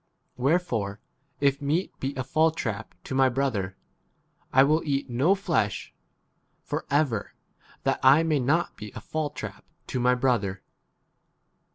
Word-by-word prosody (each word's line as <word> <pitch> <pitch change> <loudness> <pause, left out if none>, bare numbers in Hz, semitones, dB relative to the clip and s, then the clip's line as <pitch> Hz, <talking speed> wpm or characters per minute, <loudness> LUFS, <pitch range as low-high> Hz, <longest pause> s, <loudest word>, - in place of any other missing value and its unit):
Where 135 +7 +3
fore 110 - -3 0.4
if 140 0 +2
meat 155 +6 0
be 135 +1 -3
a 130 - -2
fall 155 +5 +3
trap 115 - -4
to - - -6
my 135 0 +4
brother, 115 -8 -1 0.7
I 135 - +7
will 155 +3 +3
eat 140 -3 -1
no 140 +11 +3
flesh 165 - -1 0.7
for - - -4
ever, 140 -8 0 0.5
that - - +1
I 135 +5 +6
may 155 -3 +2
not 150 +7 +1
be 105 -1 -8
a - - -5
fall 155 -1 -2
trap - - -8 0.2
to 130 - -3
my 125 +1 +4
brother. 110 -7 0
135 Hz, 150 wpm, -27 LUFS, 120-155 Hz, 0.7 s, I